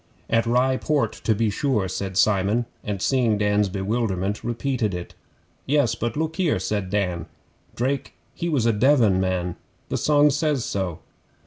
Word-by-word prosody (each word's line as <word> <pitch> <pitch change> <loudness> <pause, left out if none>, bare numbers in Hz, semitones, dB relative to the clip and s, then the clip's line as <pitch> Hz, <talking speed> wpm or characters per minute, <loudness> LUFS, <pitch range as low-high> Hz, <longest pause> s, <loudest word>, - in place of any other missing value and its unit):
'At 115 0 +2
Rye 130 +2 +2
Port, 140 -8 0
to 110 - +3
be 110 0 +1
sure,' 110 -4 0
said 95 0 -4
Simon, 105 +4 +2 0.2
and 105 -2 -3
seeing 120 -1 +2
Dan's 105 -1 +2
bewilderment, 100 0 -2
repeated 120 -3 -1
it. 90 -1 -7 0.5
'Yes, 140 -4 +2
but 120 +2 -3
look 160 +1 -2
here,' 180 -5 +2
said 100 -3 -2
Dan. 90 -4 -1 0.5
'"Drake 135 +2 -2 0.2
he 170 - -3
was 140 -8 +1
a 115 - +3
Devon 110 -4 +4
man." 90 -2 -1 0.3
The - - -1
song 150 -1 +4
says 145 -3 0
so. 95 -5 -3
110 Hz, 155 wpm, -24 LUFS, 100-130 Hz, 0.5 s, Devon